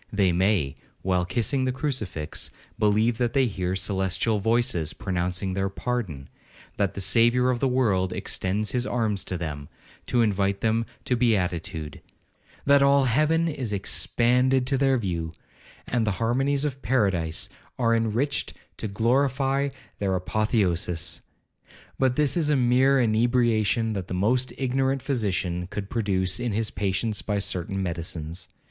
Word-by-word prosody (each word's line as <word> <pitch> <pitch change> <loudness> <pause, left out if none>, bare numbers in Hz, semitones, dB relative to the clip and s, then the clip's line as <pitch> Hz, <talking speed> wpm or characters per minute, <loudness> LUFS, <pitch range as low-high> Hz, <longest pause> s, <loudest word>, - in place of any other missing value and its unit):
They 100 -3 +2
may, 90 -6 +1 0.3
while 90 -1 +1
kissing 120 +8 0
the 130 - +1
crucifix, 125 - -2 0.3
believe 110 +2 +2
that 120 -1 0
they 135 -2 +3
hear 95 -4 -2
celestial 95 +3 0
voices 100 -8 +1
pronouncing 90 0 -2
their 95 +1 -1
pardon; 95 - -3 0.5
that 100 -3 0
the - - -4
Saviour 120 +5 +3
of 120 - -1
the 135 - +2
world 105 -8 +1
extends 105 +3 -1
his 125 -1 0
arms 110 -5 0
to 90 - -3
them, 75 -4 -5 0.4
to 120 -1 +3
invite 100 -2 0
them 115 +1 +1 0.2
to 125 - +1
beatitude; 90 - -1 0.6
that 140 0 +5
all 140 0 +5
heaven 155 +7 +2
is 130 -9 -3
expanded 125 +6 +1
to 135 +2 +1
their 135 -1 +3
view, 85 -7 -3 0.5
and 115 -3 0
the 105 - +2
harmonies 135 +6 +1
of 135 -2 -3
paradise 95 -10 +1 0.3
are 115 -2 +2
enriched 115 +5 -1 0.2
to - - -3
glorify 135 +5 +1 0.3
their 95 -2 0
apotheosis. 90 -3 -1 0.8
But 130 -2 +2
this 145 -2 +2
is 160 -4 +1
a 150 - +3
mere 130 +2 +4
inebriation 115 -1 +2
that 95 -3 -4
the 90 - -4
most 125 +7 +1
ignorant 135 0 0
physician 95 -9 -1
could 100 +1 -6
produce 95 -4 0
in 120 -3 -2
his 110 +1 -1
patients 100 +2 -1
by 105 -1 -2
certain 95 0 -1
medicines. 85 0 -4
110 Hz, 145 wpm, -25 LUFS, 95-125 Hz, 0.8 s, that